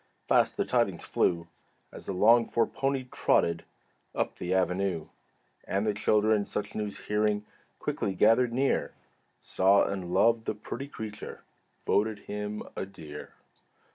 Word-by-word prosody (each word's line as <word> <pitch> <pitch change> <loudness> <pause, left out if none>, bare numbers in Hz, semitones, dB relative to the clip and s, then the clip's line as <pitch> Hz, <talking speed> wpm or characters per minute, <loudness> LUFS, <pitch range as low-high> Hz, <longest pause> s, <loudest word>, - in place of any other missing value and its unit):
Fast - - +3
the - - +1
tidings - - +1
flew 85 -1 0 0.4
As - - -11
the - - -1
longed 115 +5 +4
for 115 - +3
pony 135 -1 -1
trotted 85 0 +1 0.5
Up - - -1
the 90 - -5
avenue. 95 -2 0 0.6
And 100 +2 -1
the 105 - +1
children, 105 0 +2
such 100 0 -4
news 105 -1 -3
hearing, 105 0 +1 0.3
Quickly 95 - -2
gathered 115 +6 +4
near; 135 +3 0 0.4
Saw 95 +2 +3
and 95 -3 -4
loved 115 +4 +3
the - - -2
pretty 120 +5 -6
creature, 110 -6 -8 0.4
Voted 105 +1 +1
him 105 0 -5
"a - - -3
dear." 75 -6 -10
105 Hz, 140 wpm, -29 LUFS, 95-110 Hz, 0.6 s, longed